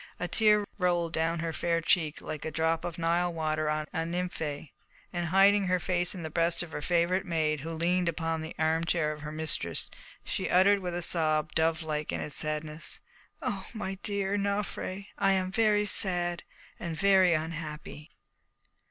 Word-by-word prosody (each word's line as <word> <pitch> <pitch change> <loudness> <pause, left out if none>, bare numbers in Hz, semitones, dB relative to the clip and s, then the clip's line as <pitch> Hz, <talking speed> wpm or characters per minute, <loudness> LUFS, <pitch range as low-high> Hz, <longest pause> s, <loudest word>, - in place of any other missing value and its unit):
A 180 - -2
tear 210 +1 +4
rolled 175 -2 +1
down 165 +1 0
her 165 -1 -2
fair 170 0 0
cheek 165 -2 +1
like 155 - -6
a - - -2
drop 160 +1 0
of 170 -2 -4
Nile 170 +1 +1
water 155 -1 -1
on 155 0 -1
a - - -1
nymphoea, 165 -4 -3 0.4
and 175 -1 -1
hiding 195 +2 +5
her 185 0 +2
face 180 +1 0
in 175 - -6
the 160 - -5
breast 170 +1 +2
of 170 - -10
her - - -4
favourite 175 +3 +2
maid, 160 -4 0
who 160 +4 -6
leaned 170 +2 +1
upon 165 -1 -2
the 160 +1 -7
armchair 160 0 +1
of 150 0 -7
her 150 0 -6
mistress, 155 - -1 0.3
she - - -3
uttered 195 +3 +5
with 180 -2 -4
a 175 - -1
sob, 155 -3 +2
dovelike 160 -2 0
in - - -2
its 150 - -4
sadness, 155 0 -3 0.4
"Oh, 205 -7 -3
my 195 -3 -4
dear 200 -1 -1
Nofré, 200 -1 -2
I 195 -1 +4
am 185 -1 0
very 210 0 +3
sad 175 -4 +1 0.4
and 165 -2 -4
very 190 -2 +5
unhappy!" 155 -1 -5
170 Hz, 175 wpm, -29 LUFS, 160-185 Hz, 0.4 s, hiding